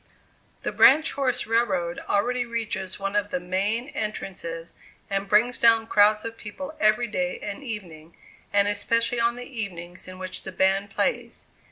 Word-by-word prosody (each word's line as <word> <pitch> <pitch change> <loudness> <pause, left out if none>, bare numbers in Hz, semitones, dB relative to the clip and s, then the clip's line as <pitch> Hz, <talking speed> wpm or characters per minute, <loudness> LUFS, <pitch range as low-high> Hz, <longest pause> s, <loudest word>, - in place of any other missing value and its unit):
The - - -2
branch 310 +4 +6
horse 255 -3 0
railroad 195 -7 0
already 245 +5 +1
reaches 225 -5 -3
one 195 +1 -3
of 205 0 +1
the 180 - -1
main 200 +8 -1
entrances, 175 - -5 0.4
and 195 0 -1
brings 235 +4 +3
down 230 -1 +5
crowds 210 0 +4
of 230 0 -6
people 280 +8 -8
every 215 +3 +4
day 270 +4 -2
and 205 +4 -6
evening, 170 - -7 0.3
and 200 0 +3
especially 230 +4 0
on 235 0 +2
the 245 0 -7
evenings 185 -9 -6
in 185 0 -9
which 185 0 -5
the 190 - -7
band 190 +2 +2
plays. 475 - -2
210 Hz, 160 wpm, -25 LUFS, 190-235 Hz, 0.4 s, branch